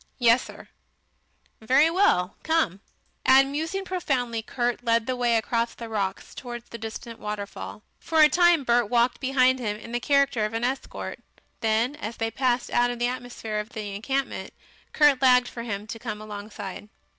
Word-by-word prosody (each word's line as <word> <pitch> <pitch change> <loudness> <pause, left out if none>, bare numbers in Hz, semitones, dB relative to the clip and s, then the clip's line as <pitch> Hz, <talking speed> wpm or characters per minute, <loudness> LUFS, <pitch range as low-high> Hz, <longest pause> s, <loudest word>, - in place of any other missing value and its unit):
"Yessir." 240 0 +1 0.9
"Very 265 +7 +4
well. 335 - +2
Come." 315 - 0 0.4
And 270 +1 +5
musing 325 +7 -3
profoundly, 255 -11 -1
Kurt 240 +1 -2
led 230 -1 +2
the 255 - -1
way 240 -2 +2
across 230 +1 -1
the 230 -1 -8
rocks 200 -3 -3
towards 240 -2 -8
the 235 - -8
distant 225 +1 -7
waterfall. 210 0 -6 0.2
For 320 - 0
a 305 - +9
time 345 -2 +4
Bert 240 -3 +2
walked 240 +1 +2
behind 260 -1 +3
him 210 -4 -2
in 230 - -10
the 240 - -1
character 275 -4 +2
of 215 +1 -2
an 230 - -2
escort; 260 +2 -3 0.4
then 225 +5 +1
as 230 -5 -6
they 225 0 -1
passed 250 +1 0
out 245 0 +3
of 245 - -4
the 240 - 0
atmosphere 245 -3 -4
of 210 +2 -7
the 210 -3 -5
encampment, 270 +7 -3 0.4
Kurt 295 -3 +4
lagged 250 -1 +5
for 235 - -7
him 210 -3 -4
to 225 +1 -7
come 215 -3 -5
alongside. 210 -1 -8
240 Hz, 170 wpm, -25 LUFS, 220-260 Hz, 0.9 s, a